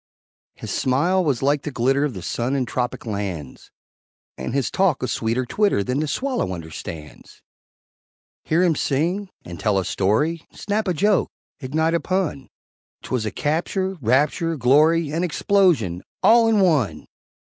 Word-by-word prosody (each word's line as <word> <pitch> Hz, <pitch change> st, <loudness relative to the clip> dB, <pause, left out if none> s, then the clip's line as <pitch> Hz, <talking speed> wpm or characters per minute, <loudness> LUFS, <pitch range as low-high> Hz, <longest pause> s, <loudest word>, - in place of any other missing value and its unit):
His -, -, -7 dB
smile 170 Hz, +9 st, +1 dB
was 140 Hz, -6 st, 0 dB
like 140 Hz, +1 st, +2 dB
the 150 Hz, -, -4 dB
glitter 135 Hz, +2 st, +1 dB
Of 145 Hz, -6 st, -2 dB
the 90 Hz, -, -7 dB
sun 120 Hz, +8 st, -2 dB
in 130 Hz, -2 st, 0 dB
tropic 125 Hz, 0 st, -3 dB
lands, 100 Hz, -, -5 dB, 0.7 s
And -, -, -5 dB
his 135 Hz, -2 st, -1 dB
talk 185 Hz, -9 st, +1 dB
a -, -, 0 dB
sweeter 115 Hz, +2 st, -1 dB
twitter 200 Hz, -, +1 dB
Than 125 Hz, +6 st, -1 dB
the 155 Hz, -, -1 dB
swallow 250 Hz, -, -2 dB
understands; 80 Hz, -1 st, -10 dB, 1.0 s
Hear 165 Hz, +3 st, +2 dB
him 170 Hz, -3 st, +3 dB
sing 175 Hz, +9 st, -1 dB, 0.2 s
and 85 Hz, -2 st, -8 dB
tell 105 Hz, +2 st, +1 dB
a 95 Hz, -, 0 dB
story 150 Hz, -, 0 dB
Snap 210 Hz, +1 st, -2 dB
a 180 Hz, -, 0 dB
joke 205 Hz, +4 st, +2 dB, 0.3 s
ignite 160 Hz, +4 st, 0 dB
a 170 Hz, -, +2 dB
pun, 185 Hz, -8 st, -2 dB, 0.5 s
'Twas 120 Hz, -4 st, -2 dB
a -, -, -3 dB
capture 185 Hz, +5 st, -1 dB
rapture 150 Hz, +7 st, +1 dB
glory, 150 Hz, +5 st, +3 dB
And 165 Hz, +3 st, 0 dB
explosion 165 Hz, -, +2 dB, 0.2 s
all 230 Hz, 0 st, +6 dB
in 220 Hz, -3 st, +3 dB
one! 130 Hz, -, +1 dB
145 Hz, 155 wpm, -22 LUFS, 115-175 Hz, 1.0 s, all